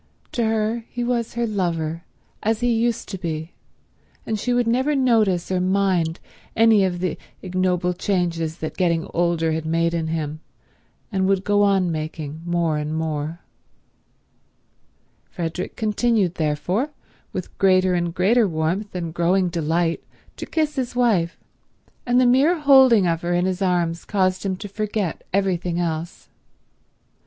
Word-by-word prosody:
To 240 - -1
her 220 +1 0
he 245 - -4
was 240 -1 -1
her 235 0 0
lover, 170 -6 -2 0.4
as 220 +2 0
he 240 -1 +2
used 230 0 0
to 190 - -5
be; 160 -1 -4 0.7
and 220 -1 -2
she 245 - -1
would 245 0 +2
never 260 +6 +1
notice 220 -10 +2
or 185 -1 +1
mind 185 -3 +1 0.4
any 225 -3 +5
of 180 -2 -1
the 185 -3 -2 0.2
ignoble 180 -1 0
changes 170 -4 -1
that - - -6
getting 170 -3 +1
older 170 -1 +1
had 160 0 -2
made 165 +1 0
in 165 -1 -1
him 155 -1 -3 0.7
and 190 -2 +1
would 195 -1 +1
go 205 0 +2
on 195 -3 +3
making 155 -1 -5
more 170 -3 +1
and 150 +1 -3
more. 160 +1 -3 1.9
Frederick 175 0 -4
continued, 215 -3 +1
therefore, 175 - -1 0.4
with 185 -2 -6
greater 185 -1 +4
and 175 -1 -1
greater 215 +5 +3
warmth 175 +5 -2
and 170 -3 -4
growing 180 +2 +2
delight 165 0 0 0.3
to - - -7
kiss 305 -2 -1
his 250 -2 -2
wife, 210 -9 +2 0.7
and 245 +1 +4
the 255 - +4
mere 280 +8 +4
holding 265 -8 +6
of 165 -1 0
her 175 0 -1
in 175 +1 +1
his 185 +1 -2
arms 175 -3 0
caused 185 -2 0
him 195 -2 -1
to 205 +3 -7
forget 205 -3 -3
everything 180 -3 0
else. 165 0 -3
185 Hz, 150 wpm, -22 LUFS, 165-215 Hz, 1.9 s, holding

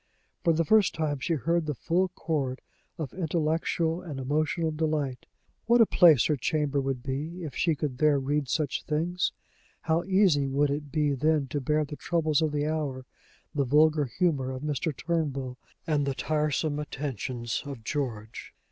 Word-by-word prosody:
For 170 - +4
the 165 +1 +1
first 215 +2 +4
time 150 -3 -1
she 165 +5 0
heard 165 +2 0
the 150 - -1
full 180 +8 +1
chord 150 -7 -3 0.4
of 150 -6 -5
intellectual 165 0 0
and 155 -7 -6
emotional 155 +4 0
delight. 150 -5 -2 0.4
What 240 +1 +5
a 230 - +8
place 165 - +6
her 150 - +2
chamber 145 +1 0
would 135 -2 -3
be, 155 +7 -4
if 150 -5 -5
she 165 -2 +2
could 135 -4 -4
there 150 -2 +4
read 140 0 -1
such 150 -2 0
things! 170 +4 -1 0.5
How 165 +1 +1
easy 185 -8 +3
would 140 +1 +1
it 145 0 -4
be 150 -1 +1
then 150 +2 +2
to 145 +2 -2
bear 150 +3 +1
the 145 +1 -8
troubles 160 -3 +1
of 155 -1 +1
the 145 0 -1
hour, 145 -5 -2 0.5
the 145 -3 +1
vulgar 150 +3 +4
humor 135 -1 0
of 130 +1 -5
Mr. 150 +2 -1
Turnbull, 140 -4 -2 0.3
and 150 -4 +1
the 135 - -1
tiresome 150 0 0
attentions 130 -5 -3
of 135 -5 -7
George! 115 -5 -4
150 Hz, 170 wpm, -28 LUFS, 135-160 Hz, 0.5 s, a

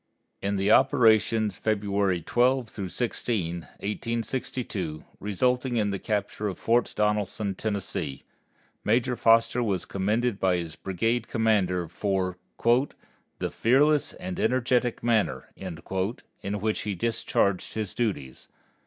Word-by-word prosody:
In 100 +1 0
the 100 +2 +2
operations 115 -5 +4
February 100 -4 0
12 120 -4 +1
16, 110 -6 -1
1862, 105 -3 -4
resulting 125 +5 0
in 105 -2 +1
the 100 - -3
capture 105 +1 -2
of 95 - -4
Fort 120 +1 +2
Donelson, 105 -1 0
Tennessee, 100 -10 -3 0.6
Major 120 +3 +2
Foster 115 +1 +4
was 100 -6 -1
commended 105 +3 0
by 95 -1 +3
his 85 -2 -5
brigade 115 +5 -1
commander 100 -6 +1
for 95 +1 -1 1.0
"the - - -3
fearless 145 +5 +3
and 185 +1 -6
energetic 125 - +1
manner" 115 -3 0
in 90 -4 -7 0.8
which 110 +2 0
he 105 -2 -3
discharged 100 -2 0
his 110 -4 -2
duties. 85 - -3
105 Hz, 110 wpm, -27 LUFS, 95-120 Hz, 1.0 s, operations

